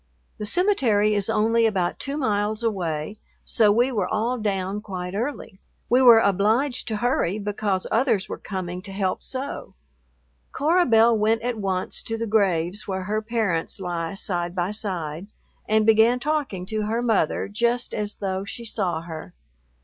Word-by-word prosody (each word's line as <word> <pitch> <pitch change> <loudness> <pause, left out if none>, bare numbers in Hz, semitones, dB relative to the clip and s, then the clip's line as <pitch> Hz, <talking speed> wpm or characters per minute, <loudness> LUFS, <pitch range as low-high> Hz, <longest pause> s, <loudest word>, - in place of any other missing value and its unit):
The 210 - -3
cemetery 235 - +2
is 205 0 -1
only 225 +1 +3
about 185 -5 -1
two 280 +1 -4
miles 215 -3 0
away, 185 -3 -2 0.3
so 215 -3 +3
we 240 +5 +3
were 225 - 0
all 230 +3 -1
down 200 -1 -2
quite 185 -3 -6
early. 225 -3 -4 0.3
We 250 +2 +5
were 240 -3 +9
obliged 225 +7 +1
to 220 - -1
hurry 215 -6 +1
because 205 -2 -2
others 230 -5 +2
were - - -6
coming 180 -3 -5
to 195 0 -10
help 190 -1 -1
sew. 265 +2 -6 0.8
Cora 345 +3 +2
Belle 230 0 +5
went 220 +1 +1
at 240 -2 -2
once 190 -2 -2
to 225 - -4
the 230 - -2
graves 195 -3 +1
where 190 -1 -2
her 215 +3 -1
parents 215 -8 -1
lie 175 -1 -3
side 175 -2 -2
by 180 +1 -1
side, 180 -5 -3 0.4
and 215 0 +3
began 225 +3 +5
talking 275 -10 -2
to 215 +2 -3
her 230 +2 -1
mother 220 -9 +1
just 235 +4 0
as 210 0 -3
though 190 -1 -3
she 235 +4 -7
saw 185 -7 -2
her. 160 - -9
210 Hz, 165 wpm, -24 LUFS, 190-230 Hz, 0.8 s, were